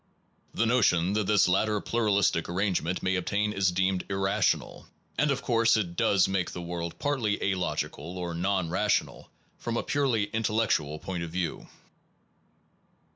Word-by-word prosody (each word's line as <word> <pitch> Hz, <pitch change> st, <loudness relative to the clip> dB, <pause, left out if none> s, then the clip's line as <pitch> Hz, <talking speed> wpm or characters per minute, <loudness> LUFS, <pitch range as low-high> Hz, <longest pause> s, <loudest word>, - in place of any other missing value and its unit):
The 115 Hz, -, +2 dB
notion 100 Hz, -7 st, +3 dB
that 105 Hz, -2 st, 0 dB
this 105 Hz, -5 st, +4 dB
latter 105 Hz, +3 st, +2 dB
pluralistic 100 Hz, -7 st, +1 dB
arrangement 90 Hz, -1 st, -1 dB
may 95 Hz, 0 st, +1 dB
obtain 105 Hz, +3 st, -1 dB
is 95 Hz, -2 st, +2 dB
deemed 95 Hz, 0 st, 0 dB
irrational; 95 Hz, +1 st, 0 dB, 0.3 s
and 150 Hz, -, +2 dB
of 135 Hz, 0 st, -1 dB
course 115 Hz, -2 st, +3 dB
it 90 Hz, -5 st, -2 dB
does 95 Hz, +2 st, +3 dB
make 95 Hz, -2 st, -1 dB
the 90 Hz, -, -5 dB
world 85 Hz, -1 st, -5 dB
partly 125 Hz, -8 st, 0 dB
alogical 90 Hz, -3 st, -2 dB
or 90 Hz, -2 st, -4 dB
non 90 Hz, 0 st, -1 dB
rational 105 Hz, +3 st, 0 dB, 0.3 s
from 120 Hz, 0 st, -3 dB
a -, -, -1 dB
purely 130 Hz, -7 st, +1 dB
intellectual 105 Hz, -9 st, 0 dB
point 90 Hz, +2 st, -5 dB
of 85 Hz, -, -4 dB
view. 85 Hz, -1 st, -3 dB
95 Hz, 145 wpm, -28 LUFS, 90-110 Hz, 0.3 s, this